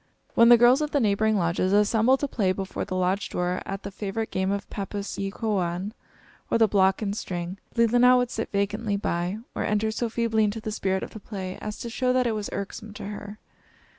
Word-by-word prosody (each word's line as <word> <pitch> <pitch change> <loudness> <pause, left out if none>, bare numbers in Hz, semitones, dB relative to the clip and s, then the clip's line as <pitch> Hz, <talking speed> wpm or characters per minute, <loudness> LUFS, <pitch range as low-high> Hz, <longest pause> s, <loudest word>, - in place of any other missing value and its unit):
When 230 0 +6
the 240 - +9
girls 245 +4 +5
of 300 - 0
the 290 - +1
neighboring 215 -1 +2
lodges 175 +1 +1
assembled 220 +5 +4
to 285 - 0
play 200 -8 +1
before 190 0 -4
the 185 - -4
lodge 185 +2 0
door 180 +1 -1
at 195 0 -5
the 200 - -6
favorite 210 +3 -4
game 190 0 0
of 200 0 -2
pappus 200 0 -5
e 195 0 -1
kowaun, 195 -2 -2 0.6
or - - +3
the 225 -1 +5
block 190 0 +3
and 200 -1 -2
string, 180 -1 -5 0.2
Leelinan 245 +2 +5
would 245 -1 0
sit 225 - -4
vacantly 205 +1 0
by, 175 0 -1 0.2
or - - -2
enter 210 +1 +1
so 230 +1 -2
feebly 225 -1 +1
into 210 +1 0
the 215 0 -5
spirit 190 -2 -1
of - - -7
the 220 - -9
play 190 -3 -6
as 210 0 -5
to 235 - -6
show 250 +1 +1
that 255 0 +2
it 235 - +1
was 210 -1 -3
irksome 200 +2 -6
to 205 - -7
her. 205 0 -7
205 Hz, 220 wpm, -26 LUFS, 195-225 Hz, 0.6 s, the